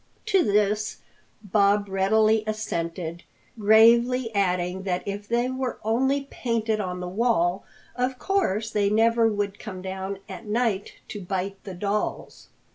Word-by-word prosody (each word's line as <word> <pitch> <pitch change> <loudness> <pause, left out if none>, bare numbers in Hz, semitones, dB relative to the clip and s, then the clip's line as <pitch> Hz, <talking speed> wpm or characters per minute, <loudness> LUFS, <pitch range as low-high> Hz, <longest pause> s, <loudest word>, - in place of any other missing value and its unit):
To 395 -4 +3
this 210 -1 +1 0.5
Bob 205 0 +2
readily 215 +3 +3
assented, 170 -5 -3 0.4
gravely 230 +3 +5
adding 180 -2 0
that 185 -2 -2
if 205 +1 -5
they 240 +2 +1
were 260 -1 -3
only 265 +6 +1
painted 225 -3 -1
on 180 -3 -3
the 180 - -4
wall, 190 -3 +1 0.3
of 250 +1 -1
course 225 - 0
they 205 -2 +1
never 225 +2 +3
could 205 -1 -2
come 185 -4 -8
down 190 +1 -4
at 190 +2 -9
night 210 -2 0 0.2
to 205 - -6
bite 190 +1 -4
the 190 -3 -7
dolls. 205 +3 -3
210 Hz, 135 wpm, -25 LUFS, 190-230 Hz, 0.5 s, gravely